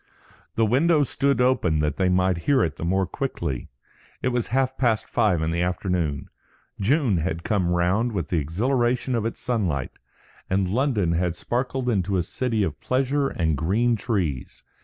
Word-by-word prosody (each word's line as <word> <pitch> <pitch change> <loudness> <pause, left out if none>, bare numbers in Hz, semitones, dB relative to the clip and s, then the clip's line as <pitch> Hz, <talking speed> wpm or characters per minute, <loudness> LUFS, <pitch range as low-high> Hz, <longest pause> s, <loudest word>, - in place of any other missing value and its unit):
The 115 - +3
window 145 +7 +3
stood 140 -1 0
open 125 -11 +2
that 75 -1 0
they 95 -1 +2
might 90 -1 +2
hear 135 -4 +4
it 80 - -2
the - - -6
more 95 +3 +1
quickly. 85 - -4 0.5
It 130 - +2
was 120 -2 -1
half 130 +1 0
past 115 -5 +1
five 90 -7 +1
in 80 - 0
the 85 +1 -1
afternoon. 90 -5 -2 0.5
June 120 - +2
had 85 0 -2
come 100 -5 0
round 90 +6 +2
again 115 - -5
with 85 -4 -2
the 85 - +1
exhilaration 120 - 0
of 115 -2 0
its 115 - -6
sunlight, 90 - -1 0.6
and 95 0 +1
London 110 - +1
had 85 0 0
sparkled 125 +3 -2
into 100 -4 +1
a 90 - +1
city 115 +3 -1
of 80 -6 -3
pleasure 135 +2 +1
and 80 -3 0
green 110 +10 +1
trees. 95 - -3
100 Hz, 175 wpm, -24 LUFS, 85-125 Hz, 0.6 s, hear